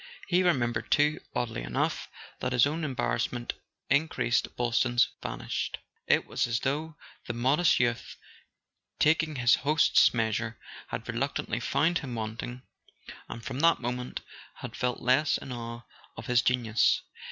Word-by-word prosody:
He 180 Hz, 0 st, +3 dB
remembered 120 Hz, -10 st, +1 dB
too, 150 Hz, +1 st, +3 dB, 0.2 s
oddly 115 Hz, -, -2 dB
enough, -, -, -2 dB, 0.3 s
that 125 Hz, -, -1 dB
as 125 Hz, -, +5 dB
his -, -, +6 dB
own 160 Hz, +3 st, -3 dB
embarrassment 120 Hz, -3 st, -1 dB, 0.4 s
in¬ 150 Hz, +3 st, +3 dB
creased 120 Hz, -5 st, 0 dB
Boylston's 120 Hz, 0 st, +2 dB
vanished. -, -, -3 dB, 0.3 s
It -, -, +3 dB
was 135 Hz, -, -1 dB
as 115 Hz, 0 st, -1 dB
though 150 Hz, +4 st, -2 dB, 0.3 s
the 120 Hz, -, -2 dB
modest 135 Hz, +8 st, +3 dB
youth, 120 Hz, -1 st, -1 dB, 0.8 s
taking 155 Hz, 0 st, +2 dB
his 120 Hz, -2 st, +4 dB
host's 150 Hz, +4 st, +4 dB
measure, 115 Hz, -1 st, -1 dB, 0.3 s
had -, -, -5 dB
reluc¬ -, -, -2 dB
tantly -, -, -2 dB
found 165 Hz, +3 st, +2 dB
him 130 Hz, -5 st, -6 dB
wanting, 115 Hz, +3 st, -5 dB, 0.7 s
and 115 Hz, -, -8 dB
from 130 Hz, 0 st, -4 dB
that 165 Hz, +2 st, +4 dB
moment 125 Hz, 0 st, -4 dB, 0.3 s
had -, -, -8 dB
felt 125 Hz, 0 st, -1 dB
less 130 Hz, +5 st, +3 dB
in 135 Hz, -, -9 dB
awe 120 Hz, -1 st, -6 dB, 0.3 s
of 115 Hz, -, -7 dB
his 120 Hz, 0 st, +3 dB
genius. 120 Hz, -3 st, +2 dB
125 Hz, 150 wpm, -29 LUFS, 120-150 Hz, 0.8 s, his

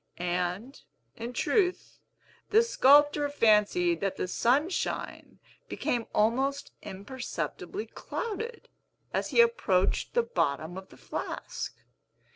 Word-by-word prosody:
And, 180 Hz, +8 st, -3 dB, 0.3 s
in 235 Hz, +1 st, -5 dB
truth, 365 Hz, -, 0 dB, 0.5 s
the 445 Hz, +2 st, +5 dB
sculptor 290 Hz, -, +5 dB
fancied 285 Hz, -, +3 dB
that 195 Hz, -1 st, -1 dB
the -, -, -2 dB
Sunshine 285 Hz, -, -1 dB, 0.3 s
became 235 Hz, -2 st, -2 dB
almost 260 Hz, +6 st, +1 dB
imperceptibly 260 Hz, -, -5 dB
clouded, 460 Hz, +1 st, -5 dB, 0.5 s
as -, -, -1 dB
he 470 Hz, -, +6 dB
approached 215 Hz, -, +1 dB
the 475 Hz, -, +4 dB
bottom 160 Hz, -, -1 dB
of 190 Hz, 0 st, -9 dB
the -, -, -16 dB
flask. -, -, -5 dB
265 Hz, 100 wpm, -29 LUFS, -, 0.5 s, he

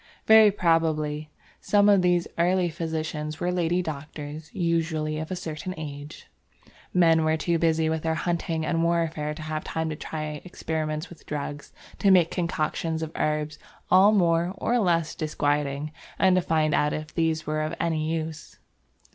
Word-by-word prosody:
Very 220 Hz, -1 st, +8 dB
probably 155 Hz, -5 st, 0 dB, 0.3 s
some 205 Hz, 0 st, +3 dB
of 200 Hz, -2 st, +6 dB
these 175 Hz, -1 st, +2 dB
early 180 Hz, +1 st, +2 dB
physicians 160 Hz, -1 st, -4 dB
were 175 Hz, -, 0 dB
lady 175 Hz, 0 st, +1 dB
doctors 150 Hz, 0 st, -7 dB
usually 160 Hz, -3 st, -1 dB
of 155 Hz, -, -5 dB
a 185 Hz, -, -2 dB
certain 170 Hz, +2 st, -5 dB
age. 145 Hz, -1 st, -8 dB, 0.7 s
Men 165 Hz, -3 st, +4 dB
were 155 Hz, 0 st, +2 dB
too 165 Hz, +1 st, 0 dB
busy 160 Hz, -1 st, +2 dB
with 160 Hz, 0 st, -1 dB
their 160 Hz, 0 st, 0 dB
hunting 165 Hz, -1 st, -1 dB
and 165 Hz, +1 st, 0 dB
warfare 165 Hz, -3 st, 0 dB
to 160 Hz, -, -8 dB
have 155 Hz, 0 st, -3 dB
time 160 Hz, 0 st, -3 dB
to -, -, -3 dB
try 150 Hz, -1 st, -5 dB
experiments 155 Hz, -3 st, -3 dB
with 175 Hz, -, -15 dB
drugs, 145 Hz, -1 st, -5 dB, 0.3 s
to 200 Hz, -, +3 dB
make 180 Hz, -3 st, +5 dB
concoctions 160 Hz, -1 st, -2 dB
of 160 Hz, -, -5 dB
herbs 150 Hz, 0 st, -1 dB, 0.3 s
all 190 Hz, +3 st, +7 dB
more 175 Hz, -2 st, +2 dB
or 245 Hz, +4 st, +1 dB
less 170 Hz, -6 st, +1 dB
disquieting 145 Hz, -1 st, -1 dB, 0.3 s
and 190 Hz, -1 st, +4 dB
to 185 Hz, -, +3 dB
find 155 Hz, -3 st, +1 dB
out 150 Hz, 0 st, +2 dB
if 155 Hz, 0 st, -5 dB
these 160 Hz, -1 st, 0 dB
were 155 Hz, 0 st, -1 dB
of 155 Hz, +2 st, -2 dB
any 160 Hz, -1 st, 0 dB
use. 160 Hz, -1 st, -5 dB
160 Hz, 165 wpm, -26 LUFS, 155-170 Hz, 0.7 s, Very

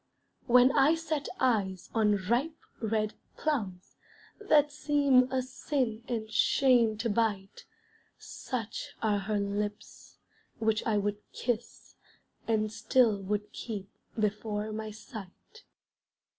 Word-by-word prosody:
When 250 Hz, +1 st, +6 dB
I 290 Hz, +3 st, +4 dB
set 315 Hz, -3 st, -3 dB
eyes 200 Hz, -8 st, 0 dB
on 215 Hz, -2 st, +3 dB
ripe, 265 Hz, -, 0 dB, 0.2 s
red 215 Hz, -1 st, 0 dB, 0.2 s
plums 205 Hz, -12 st, -3 dB, 0.4 s
That 300 Hz, -8 st, +4 dB
seem 285 Hz, -4 st, +3 dB
a 260 Hz, -1 st, 0 dB
sin 250 Hz, -3 st, -2 dB
and 225 Hz, -3 st, -2 dB
shame 235 Hz, -1 st, +4 dB
to 235 Hz, -, -1 dB
bite, 205 Hz, -3 st, -1 dB, 0.5 s
Such 230 Hz, -4 st, -6 dB
are 210 Hz, -2 st, +2 dB
her 210 Hz, +2 st, -1 dB
lips, 205 Hz, +1 st, -4 dB, 0.4 s
which 220 Hz, -1 st, +1 dB
I 215 Hz, -2 st, +2 dB
would 205 Hz, 0 st, -1 dB
kiss, 235 Hz, -1 st, -4 dB, 0.5 s
And 215 Hz, -1 st, +1 dB
still 225 Hz, -3 st, +2 dB
would 210 Hz, +2 st, -2 dB
keep 205 Hz, -4 st, -6 dB, 0.3 s
before 210 Hz, 0 st, -1 dB
my 215 Hz, 0 st, -4 dB
sight. 215 Hz, -, -11 dB
220 Hz, 115 wpm, -30 LUFS, 210-255 Hz, 0.5 s, When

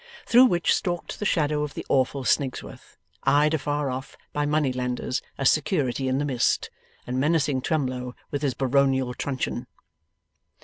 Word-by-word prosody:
Through 245 Hz, +2 st, +7 dB
which 175 Hz, -8 st, +2 dB
stalked 175 Hz, -2 st, -3 dB
the 210 Hz, -, 0 dB
shadow 150 Hz, -2 st, +1 dB
of 150 Hz, -1 st, -4 dB
the -, -, -6 dB
awful 135 Hz, +1 st, +1 dB
Snigsworth, 130 Hz, +2 st, -2 dB, 0.3 s
eyed 150 Hz, +2 st, +4 dB
afar 145 Hz, -2 st, -1 dB
off 130 Hz, +1 st, -6 dB, 0.2 s
by 145 Hz, 0 st, 0 dB
money 150 Hz, -3 st, +1 dB
lenders 125 Hz, 0 st, -2 dB, 0.2 s
as 135 Hz, -, +4 dB
Security 140 Hz, -5 st, 0 dB
in 130 Hz, 0 st, +1 dB
the 145 Hz, -, 0 dB
Mist, 130 Hz, -4 st, 0 dB, 0.3 s
and 125 Hz, +1 st, -2 dB
menacing 145 Hz, -2 st, +1 dB
Twemlow 130 Hz, -4 st, -2 dB, 0.2 s
with 145 Hz, -, -2 dB
his 140 Hz, -4 st, 0 dB
baronial 135 Hz, -1 st, +2 dB
truncheon. 130 Hz, -2 st, -3 dB
140 Hz, 150 wpm, -25 LUFS, 130-150 Hz, 0.3 s, Through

